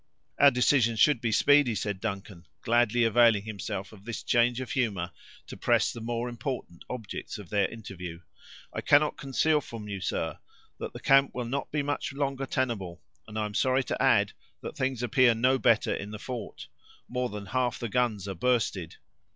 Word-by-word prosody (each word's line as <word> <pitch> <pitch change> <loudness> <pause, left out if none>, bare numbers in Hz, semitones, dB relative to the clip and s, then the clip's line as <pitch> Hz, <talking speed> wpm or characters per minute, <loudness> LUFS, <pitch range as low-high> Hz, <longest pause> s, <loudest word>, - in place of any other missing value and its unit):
"Our 140 - +8
decision 125 -2 +3
should 130 +2 +4
be 115 - 0
speedy," 140 0 +4
said 100 0 -3
Duncan, 95 -5 -5 0.2
gladly 120 0 +3
availing 115 -2 +4
himself 100 -2 -5
of 100 -2 -15
this 115 +1 -6
change 120 0 +2
of 130 - -5
humor, 100 -9 -1 0.3
to - - -9
press - - +2
the 115 - -8
more 120 +1 -2
important 120 -6 -5
objects 115 -4 -6
of 100 -5 -11
their 100 -2 +2
interview; 90 -6 -8 0.5
"I - - -3
cannot 150 +1 +4
conceal 150 +3 +1
from 115 -5 -8
you, 100 -2 -5
sir, - - -2 0.4
that - - -5
the - - -8
camp 135 0 +4
will 125 -1 -2
not 135 +4 -3
be 150 -1 0
much 145 -1 -2
longer 135 -1 -2
tenable; 105 -11 -2 0.2
and 110 0 -7
I 110 - 0
am 105 - -6
sorry 130 +4 +2
to - - -3
add, - - +4 0.3
that - - -7
things 130 -2 -1
appear 120 0 +4
no 130 +3 +2
better 115 -3 +3
in 100 - -5
the 105 - -6
fort; 120 +1 -7 0.4
more 125 0 -2
than 105 -2 -7
half 125 +3 -1
the 120 - -4
guns 110 -4 0
are 95 - -3
bursted." 95 -5 0
115 Hz, 185 wpm, -28 LUFS, 105-130 Hz, 0.5 s, Our